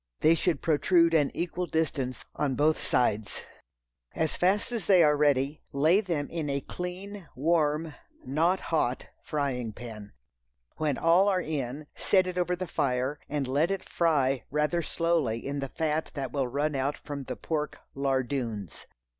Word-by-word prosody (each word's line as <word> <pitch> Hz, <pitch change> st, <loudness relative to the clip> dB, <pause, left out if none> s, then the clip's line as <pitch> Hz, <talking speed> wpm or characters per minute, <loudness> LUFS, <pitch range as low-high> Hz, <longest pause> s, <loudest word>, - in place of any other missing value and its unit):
They 155 Hz, -, +6 dB
should 165 Hz, -2 st, 0 dB
protrude 165 Hz, +2 st, +4 dB
an 150 Hz, -3 st, +4 dB
equal 175 Hz, +1 st, -2 dB
distance 135 Hz, -7 st, -2 dB
on 140 Hz, -3 st, 0 dB
both 155 Hz, +3 st, +2 dB
sides. 110 Hz, -4 st, 0 dB, 0.7 s
As 160 Hz, -2 st, 0 dB
fast 195 Hz, +6 st, +1 dB
as 235 Hz, -3 st, -3 dB
they 185 Hz, -4 st, +7 dB
are 150 Hz, -1 st, +5 dB
ready, 145 Hz, 0 st, +2 dB
lay 160 Hz, +8 st, +4 dB
them 165 Hz, -8 st, -2 dB
in 160 Hz, -3 st, -2 dB
a 140 Hz, 0 st, -1 dB
clean, 180 Hz, +3 st, -6 dB
warm 155 Hz, +1 st, +1 dB, 0.3 s
(not 165 Hz, +8 st, +2 dB
hot) 130 Hz, -5 st, +1 dB, 0.2 s
frying 130 Hz, -7 st, -2 dB
pan. 110 Hz, -3 st, -9 dB, 0.6 s
When 150 Hz, -4 st, 0 dB
all 170 Hz, +4 st, +4 dB
are 190 Hz, -2 st, +3 dB
in, 145 Hz, -3 st, -3 dB
set 190 Hz, -2 st, +3 dB
it 180 Hz, 0 st, -3 dB
over 180 Hz, 0 st, +1 dB
the 185 Hz, +1 st, -4 dB
fire, 135 Hz, -2 st, -1 dB
and 145 Hz, -2 st, -1 dB
let 145 Hz, +6 st, +2 dB
it 195 Hz, -1 st, -3 dB
fry 140 Hz, -7 st, +1 dB
rather 150 Hz, +4 st, +1 dB
slowly 160 Hz, -9 st, 0 dB
in 140 Hz, +1 st, -2 dB
the 135 Hz, -1 st, -3 dB
fat 155 Hz, +1 st, -1 dB
that 135 Hz, -3 st, -3 dB
will 135 Hz, -3 st, 0 dB
run 145 Hz, +4 st, -1 dB
out 140 Hz, +2 st, -1 dB
from 140 Hz, -2 st, -6 dB
the -, -, -4 dB
pork 150 Hz, -2 st, -3 dB, 0.2 s
"lardoons." 130 Hz, -, -2 dB
150 Hz, 160 wpm, -28 LUFS, 135-170 Hz, 0.7 s, they